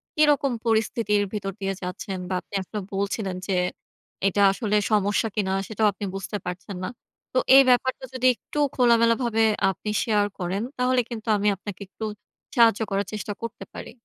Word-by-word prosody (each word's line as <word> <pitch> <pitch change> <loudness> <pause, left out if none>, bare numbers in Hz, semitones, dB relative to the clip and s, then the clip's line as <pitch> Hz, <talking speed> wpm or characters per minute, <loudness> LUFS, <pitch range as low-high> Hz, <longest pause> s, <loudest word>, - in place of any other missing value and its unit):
কি 305 - +1
রকম 280 -2 +1
পরিস্থিতির 220 -2 +2
ভিতর 195 -2 -3
দিয়ে 195 0 -1
যাচ্ছেন 185 +1 -5
বা - - -1
আপনি - - -26
আসলে 210 +3 -5
বলছিলেন 195 -1 -2
যে, 195 - 0 0.7
এটা 200 +1 +2
আসলে 210 0 -1 0.2
সমস্যা 205 +1 +2
কি 210 - +2
না 190 - 0
সেটাও 220 0 +1
আপনি 200 - -5
বুঝতে 195 +2 -4
পারছেন 180 +2 -5
না। - - -1 0.5
তো - - 0 0.2
এই 275 - +11
ব্যাপারটা 260 +1 +2
যদি 255 0 -2
একটু 295 - -10 0.2
খোলামেলাভাবে 230 -1 +3 0.3
আপনি 210 +2 -4
শেয়ার 210 -2 +2
করেন, 185 +3 -2 0.2
তাহলে 250 0 +3
কিন্তু 225 -1 -7
আমি 205 +1 0
আপনাকে 200 +1 -8
একটু 220 - -10 0.5
সাহায্য 230 -2 +5
করার 200 0 0
চেষ্টা 210 0 -4
করতে 230 -3 -6
পারি। - - -7
210 Hz, 170 wpm, -25 LUFS, 195-230 Hz, 0.7 s, এই